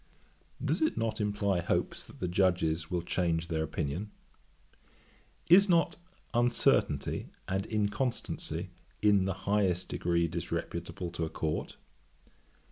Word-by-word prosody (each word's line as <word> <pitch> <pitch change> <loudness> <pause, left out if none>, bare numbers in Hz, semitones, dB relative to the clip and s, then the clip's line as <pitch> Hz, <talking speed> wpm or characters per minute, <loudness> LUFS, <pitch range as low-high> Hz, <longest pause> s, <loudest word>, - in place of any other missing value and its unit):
Does - - +1
it 315 - +2
not 110 -1 -1
imply 100 -2 +1
hopes - - -1
that - - -15
the 90 - -1
Judges 85 -3 +1
will 90 -2 -1
change 85 -2 0
their 80 -2 0
opinion? 80 +5 -3 1.4
Is 195 +4 +7
not 170 -2 +3 0.4
uncertainty 120 0 +2 0.2
and 95 +2 -1
inconstancy 105 - -2 0.3
in 100 -3 +5
the 95 - 0
highest 95 -3 +1
degree 85 -1 +1
disreputable 85 +1 -4
to 85 -1 -2
a - - -4
Court? 80 -1 -3
95 Hz, 120 wpm, -31 LUFS, 85-105 Hz, 1.4 s, Is